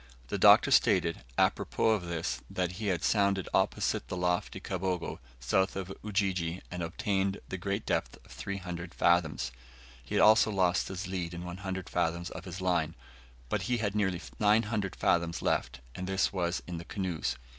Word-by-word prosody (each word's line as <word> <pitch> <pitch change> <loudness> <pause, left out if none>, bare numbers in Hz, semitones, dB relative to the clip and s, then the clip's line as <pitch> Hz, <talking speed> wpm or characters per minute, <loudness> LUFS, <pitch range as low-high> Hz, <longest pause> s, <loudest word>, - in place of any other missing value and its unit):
The - - -2
Doctor - - +7
stated, 85 0 +4 0.2
apropos 110 - +2
of 100 -6 0
this, 85 -1 -2
that 90 -1 -1
he 105 +4 -4
had 90 -4 0
sounded 100 -3 +2
opposite - - +1
the 90 - -4
lofty 90 0 0
Kabogo, 95 -2 -3 0.2
south 95 +11 +1
of 95 0 -4
Ujiji, 95 -5 0
and 90 0 -4
obtained 95 +3 -1
the 95 - -4
great 100 +3 -2
depth - - -1
of - - -17
300 90 -3 -5
fathoms. 80 -6 +2 0.5
He - - -2
also 110 +1 +6
lost 95 -4 +2
his 95 +1 -5
lead 90 -2 -3
and 85 +1 -6
100 95 +1 -5
fathoms 85 0 -1
of - - -8
his 95 +1 -6
line, 85 -3 +1 0.5
but - - -1
he 125 - +2
had 105 -3 -1
nearly 95 -4 +1 0.2
900 105 -2 +2
fathoms 85 0 +1
left, 65 +1 0
and 90 0 -5
this 95 +1 +1
was 90 -2 -1
in 90 -1 -5
the 85 - -9
canoes. 90 -4 -2
90 Hz, 165 wpm, -30 LUFS, 85-100 Hz, 0.5 s, Doctor